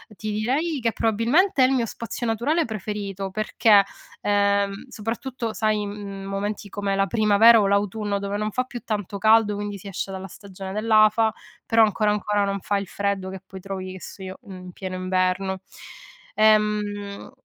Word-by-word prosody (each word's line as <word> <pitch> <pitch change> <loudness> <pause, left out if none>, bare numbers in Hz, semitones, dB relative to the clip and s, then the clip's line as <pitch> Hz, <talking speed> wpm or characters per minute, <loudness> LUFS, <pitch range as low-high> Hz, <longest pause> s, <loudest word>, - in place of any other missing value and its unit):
Ti 215 +1 -4
direi 270 +9 0
che 230 -1 +1
probabilmente 255 - +2
è - - +6
il 270 - +1
mio 240 -3 +1
spazio 230 +2 -5
naturale 260 +9 +1
preferito, 200 -3 -4
perché, 215 0 +4 0.4
ehm, 200 +2 +1
soprattutto, 230 +1 -4
sai, 215 -1 +1
in 200 -1 -4
m 200 -1 -7
momenti 205 +1 -3
come 200 0 -2
la 195 - +2
primavera 220 +2 +6
o 200 - +2
l'autunno, 205 +1 0
dove 200 +1 -3
non 215 0 -1
fa 255 - 0
più 245 -1 -8
tanto 205 -2 -3
caldo, 220 -1 +4
quindi 205 0 -4
si 200 +1 -11
esce 195 0 -4
dalla 190 0 -6
stagione 195 0 -9
dell'afa, 215 0 +4 0.3
però 225 0 +5
ancora 210 0 +2
ancora, 210 0 0
non 200 0 -2
fa 205 - 0
il 200 -2 -4
freddo 200 -2 -2
che 190 -1 -8
poi 190 0 -10
trovi, 185 -1 -6
e 185 - -10
so 190 - -9
io, 185 0 -7
in 185 -1 -9
pieno 185 0 -6
inverno. 185 +1 0 0.8
Ehm, 210 -1 +1
205 Hz, 175 wpm, -24 LUFS, 195-220 Hz, 0.8 s, è